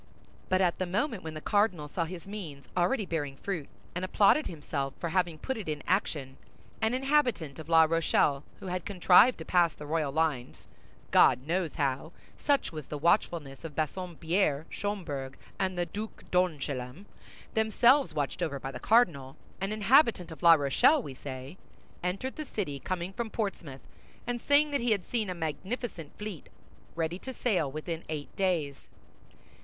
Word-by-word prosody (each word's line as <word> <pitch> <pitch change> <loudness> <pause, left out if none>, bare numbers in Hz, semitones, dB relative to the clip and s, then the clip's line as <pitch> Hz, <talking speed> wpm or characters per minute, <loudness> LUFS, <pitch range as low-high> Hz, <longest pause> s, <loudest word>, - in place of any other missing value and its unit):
But 185 0 +3
at 175 -2 +2
the 185 - -1
moment 205 +3 -1
when 160 -1 -7
the 155 - -6
cardinal 200 -7 +1
saw 165 +3 -2
his 170 0 -8
means 175 -9 -7
already 195 +5 +1
bearing 145 -6 -3
fruit, 175 -6 -4 0.2
and 180 - -3
applauded 200 +10 +4
himself 145 -4 -4
for 170 - -2
having 175 -2 0
put 265 +10 -3
it 205 -7 -5
in 150 -1 -3
action, 145 -8 -1 0.4
an 220 +2 +2
inhabitant 255 - +1
of 160 0 -9
La 165 -1 +7
Rochelle 155 -3 +2 0.2
who - - -10
had 180 -1 -3
contrived 195 +5 +5
to 160 - -8
pass 175 -3 +3
the 150 - -9
royal 155 -2 0
lines—God 140 -3 +1
knows 170 0 -1
how, 140 +3 -1 0.2
such 285 -1 +1
was 155 -3 -7
the 150 - -4
watchfulness 160 -4 +1
of 160 -3 -7
Bassompierre, 165 -1 -1
Schomberg, 160 -10 -4 0.2
and 185 -1 -1
the 175 - +1
Duc 210 +6 -7
d'Angoulême, 150 -3 -1 0.5
themselves 235 - +4
watched 145 -2 -2
over 140 -3 -1
by 135 - -5
the - - -7
cardinal—an 185 - +1
inhabitant 215 - +4
of 160 - -10
La 170 -1 +9
Rochelle, 155 - +4
we 135 - -7
say, 130 +4 -8 0.4
entered 195 +9 -3
the 310 - -3
city, 180 - -3
coming 185 +4 -3
from 235 +2 -3
Portsmouth, 175 - -4 0.4
and 240 -1 -3
saying 290 +1 +4
that 280 -3 0
he 235 -2 +3
had 200 -4 -3
seen 220 -5 -1
a 180 - -3
magnificent 170 - -5
fleet 210 -7 -7 0.5
ready 165 +2 -2
to 260 - -6
sail 180 - 0
within 160 +3 -5
eight 150 -2 -5
days. 165 -8 -1
175 Hz, 165 wpm, -30 LUFS, 150-205 Hz, 0.5 s, La